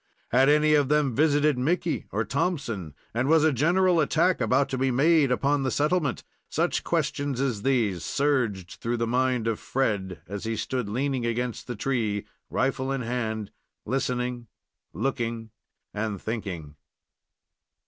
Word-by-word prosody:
Had 130 +3 +4
any 150 +1 +4
of 145 -3 +3
them 150 -4 +2
visited 145 -2 +3
Mickey 165 +4 0
or 110 +2 -1
Thompson, 120 - -2 0.2
and 120 +3 0
was 160 -1 +5
a 160 -2 +4
general 175 +6 +3
attack 165 +2 +2
about 130 +5 +3
to 130 - -2
be 135 0 +2
made 145 +2 +4
upon 140 +3 +2
the 135 - 0
settlement? 150 -1 0 0.3
Such - - 0
questions 145 -3 -1
as 125 -7 -1
these 110 -9 +1
surged 125 -11 0
through 120 +1 -1
the 115 - 0
mind 125 0 +1
of 115 -2 -1
Fred, 100 -9 -1
as 100 +1 -5
he 115 0 -1
stood 125 -3 -2
leaning 130 +3 -1
against 120 0 -3
the 120 - -4
tree, 110 -4 -1 0.2
rifle 130 0 0
in 135 -1 -1
hand, 110 -3 -3 0.3
listening, 125 -1 -2 0.4
looking, 115 - -3 0.4
and 105 -1 -2
thinking. 90 -10 -5
125 Hz, 150 wpm, -26 LUFS, 115-145 Hz, 0.4 s, was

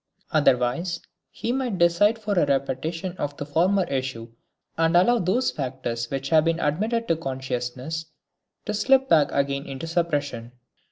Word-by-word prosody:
Otherwise 150 +4 +2 0.3
he 235 - -3
might 250 -6 -1
decide 180 +6 +4
for 210 -2 -2
a 175 -6 +2
repetition 150 +6 -2
of 145 0 -4
the 145 - -4
former 180 +6 +2
issue 130 -6 -4 0.4
and 165 +1 +3
allow 235 +7 +4
those 210 +7 +1
factors 125 -4 -4
which 135 0 -3
have 155 -1 +4
been 165 0 +1
admitted 215 +10 0
to 165 - +2
consciousness 130 +2 -4 0.6
to 210 - -2
slip 265 +5 +3
back 155 -3 +4
again 140 0 -1
into 135 +3 -6
suppression. 145 -8 -2
160 Hz, 150 wpm, -24 LUFS, 135-185 Hz, 0.6 s, decide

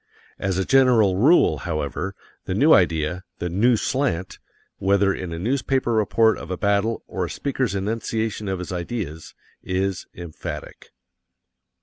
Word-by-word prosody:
As 95 -1 -1
a 95 - 0
general 125 -8 +4
rule, 145 - +4
however, 80 +4 -3 0.3
the 90 - -2
new 150 +9 +5
idea, 85 0 +2
the 90 - -3
"new 115 +6 +3
slant," 120 -9 -1 0.4
whether 100 0 +2
in 90 -3 -5
a 85 - -4
newspaper 130 +4 0
report 110 +1 +3
of 80 - -9
a 95 - -3
battle 100 +4 0
or 90 - -3
a - - -6
speaker's 130 - -2
enunciation 110 +1 -2
of 95 - -1
his 90 0 -6
ideas, 85 -3 -5 0.3
is 95 0 -2
emphatic. 85 -3 -8
100 Hz, 140 wpm, -23 LUFS, 90-115 Hz, 0.4 s, new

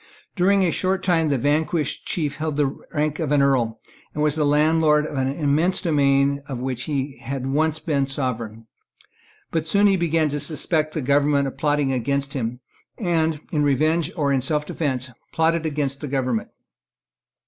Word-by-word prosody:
During 195 +1 +3
a 175 - +2
short 190 +2 -1
time 165 -4 +2
the 140 - +1
vanquished 150 +3 0
chief 150 -4 -2
held 155 -1 -3
the 140 -2 +1 0.2
rank 150 -1 -1
of 155 -4 -2
an 145 -1 +4
Earl, 125 -5 +1 0.4
and 150 - 0
was 150 -1 +3
the 150 -2 +1
landlord 150 0 +3
of 150 - -6
an 130 -1 0
immense 150 +5 +1
domain 140 -4 +2
of 135 -4 -5
which 125 -1 -3
he 140 -2 -3
had 135 -1 -5
once 155 +3 +1
been 145 -4 0
the - - -11
sovereign. 115 -5 -3 0.9
But 160 -1 -1
soon 200 +5 +4
he 195 -2 +4
began 165 -2 +1
to 145 +1 -2
suspect 155 +1 -1
the 155 - -1
government 140 +1 +2
of 135 - -6
plotting 145 -2 +1
against 140 +2 -1
him, 125 -1 -3 0.4
and, 160 -6 0
in 150 - +1
revenge 155 +3 +1
or 140 -3 +1
in 135 - +1
selfdefence, 140 -2 -1 0.2
plotted 165 0 +1
against 140 -2 -2
the 150 - -4
government. 130 -4 -1
145 Hz, 175 wpm, -22 LUFS, 135-160 Hz, 0.9 s, an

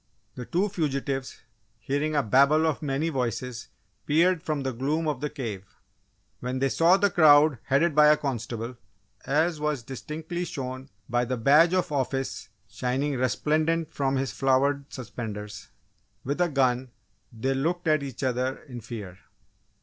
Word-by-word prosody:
The 125 - -7
two 185 +4 +1
fugitives, 140 -7 -3 0.4
hearing 145 +2 -2
a 145 - +3
babel 140 +8 +4
of 160 0 0
many 145 +2 -1
voices, 125 -3 -3 0.4
peered 170 +3 +3
from 155 -4 -2
the 135 - -1
gloom 150 +7 -1
of 145 -4 -2
the 150 - -1
cave. 115 -10 -5 0.8
When 125 +1 -3
they 135 +1 +1
saw 170 +7 +4
the 200 0 +2
crowd 150 -5 +6
headed 150 +4 +2
by 150 +1 +6
a 150 0 +6
constable 120 -3 -4 0.5
(as 155 +3 +1
was 150 -4 -1
distinctly 160 +7 -5
shown 130 -4 -6 0.2
by 120 +1 +1
the 125 +1 -2
badge 150 +9 +5
of 180 -3 0
office 135 -4 -2 0.2
shining 125 +8 -2
resplendent 155 +6 0
from 135 -1 0
his 135 -3 -1
flowered 140 +3 +1
suspenders) 105 -4 -7 0.5
with 140 +6 -2
a 175 - +3
gun, 130 -3 +1 0.4
they 125 +4 -1
looked 165 +6 -1
at 155 -1 +3
each 135 -1 -6
other 130 +1 0
in 125 -5 -9
fear. 105 -5 -8
140 Hz, 150 wpm, -26 LUFS, 125-155 Hz, 0.8 s, crowd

